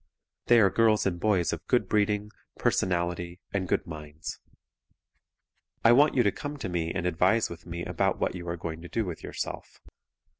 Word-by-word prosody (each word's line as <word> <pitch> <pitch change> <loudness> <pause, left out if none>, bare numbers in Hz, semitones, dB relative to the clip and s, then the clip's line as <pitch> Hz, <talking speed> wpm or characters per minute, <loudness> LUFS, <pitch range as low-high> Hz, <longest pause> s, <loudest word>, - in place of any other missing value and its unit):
They 120 -1 +7
are 100 -4 +5
girls 110 -2 +3
and 90 -3 0
boys 95 -4 +2
of - - -7
good - - +2
breeding, 105 0 +1 0.3
personality 85 -1 0
and 95 -2 -1
good - - 0
minds. 75 -2 -7 1.5
I 115 - +8
want 145 +5 +5
you 125 - +4
to 100 - +3
come 145 +6 -6
to 135 - -4
me 85 -2 -1
and 90 -2 -3
advise 90 +6 +2
with 85 +1 -10
me 85 0 -5
about - - 0
what - - -1
you 85 -1 -6
are 85 - -3
going 80 -1 -5
to 85 - -9
do 115 - -1
with 90 -3 -6
yourself. - - -6
90 Hz, 185 wpm, -28 LUFS, 85-105 Hz, 1.5 s, I